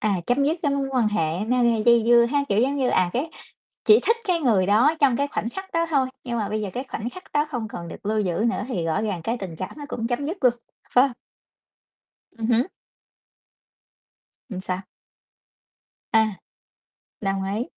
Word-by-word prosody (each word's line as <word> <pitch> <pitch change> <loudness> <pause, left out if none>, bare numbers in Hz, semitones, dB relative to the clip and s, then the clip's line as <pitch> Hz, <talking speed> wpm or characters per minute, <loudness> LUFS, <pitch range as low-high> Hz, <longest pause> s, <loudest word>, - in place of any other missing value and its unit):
À, 205 -2 +1
chấm 265 +3 +2
dứt 315 +4 +1
cái 290 -5 +1
mối 275 -1 0
quan 245 -5 +2
hệ 165 -5 0
nó 250 +1 +2
gây 230 -2 +2
dây 235 -1 +6
dưa 235 0 +6
ha, 285 -1 +2
kiểu 200 +2 +3
giống 270 +4 +2
như, 260 -3 +1
à, 180 -1 +2
cái 285 +7 -1 0.6
chỉ 430 +1 +7
thích 460 - +2
cái 350 -2 +2
người 215 - +3
đó 235 +11 +4
trong 270 -4 +4
cái 280 - +1
khoảnh 230 -4 -3
khắc 385 +7 -8
đó 335 0 +2
thôi, 270 -4 +2 0.2
nhưng 240 -2 -3
mà 205 -2 -2
bây 215 0 -2
giờ 205 - -3
cái 250 - -3
khoảnh 230 +2 -4
khắc 370 +7 -11
đó 295 +1 +2
không 240 -6 -3
còn 170 -4 -7
được 170 - -10
lưu 215 +1 +1
giữ 185 -4 0 0.2
nữa - - -2
thì 180 -10 -2
rõ 165 +6 0
ràng 200 -6 -2
cái 230 +7 -2
tình 185 -6 -6
cảm 185 +3 -5
nó 290 - -7
cũng 230 -5 -3
chấm 245 +3 -2
dứt 335 +6 -3
luôn, 245 -1 +5 0.4
phải 250 - +7
hông? - - -7 1.2
Ừm 225 -2 -4
hứm. 240 +5 +3 1.8
Ừm, 190 -3 -5
sao? 185 0 -3 1.3
À. 220 -1 +4 0.9
Đồng 195 -1 -1
ý, 225 - -1
235 Hz, 210 wpm, -24 LUFS, 210-280 Hz, 1.8 s, chỉ